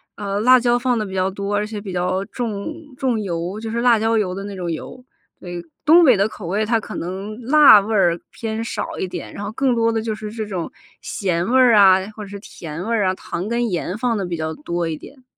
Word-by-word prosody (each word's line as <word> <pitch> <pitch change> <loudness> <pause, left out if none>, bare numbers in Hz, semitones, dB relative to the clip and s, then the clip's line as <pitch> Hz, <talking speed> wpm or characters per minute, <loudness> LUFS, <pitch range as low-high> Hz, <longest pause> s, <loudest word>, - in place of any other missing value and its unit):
呃， 200 -1 -3
辣 255 +2 +6
椒 240 0 +2
放 245 -1 0
得 215 - -1
比 190 - -7
较 185 0 +1
多， 200 +1 -3
而 210 - 0
且 210 -1 -6
比 195 -2 -7
较 180 +2 -1
重 220 +2 -4 0.2
重 255 -4 0
油， 180 +1 -3
就 225 0 -5
是 235 +1 -1
辣 240 -2 +5
椒 225 +1 +1
油 185 -4 0
的 195 - -5
那 200 -1 -6
种 175 -2 -3
油， 250 +10 -7 0.4
对。 175 -1 -7 0.2
东 330 +3 +7
北 255 - +6
的 200 +2 +1
口 190 -6 -9
味， 205 +4 0
它 225 +1 +2
可 - - -8
能 195 +5 -5
辣 265 -5 +7
味 220 +2 -3
儿 175 -4 +3
偏 225 -1 -4
少 230 - -4
一 - - -1
点， 180 - -7
然 205 - -6
后 205 - -4
更 255 +2 +1
多 230 0 +2
的 225 - -1
就 220 -1 -3
是 215 0 -7
这 220 -1 -4
种 185 -5 -4 0.3
咸 175 -3 -1
味 260 - +5
儿 245 -3 +6
啊， 190 -2 +7 0.2
或 215 - -7
者 - - -9
是 200 - -7
甜 165 -4 -8
味 230 - +1
儿 210 - +1
啊， 185 - +2
糖 185 +2 -5
跟 235 -1 0
盐 180 +2 -3
放 235 0 0
得 195 - -2
比 175 -2 -4
较 160 0 -3
多 170 +2 -3
一 160 - -2
点。 260 - -14
210 Hz, 275 characters per minute, -21 LUFS, 185-230 Hz, 0.4 s, 东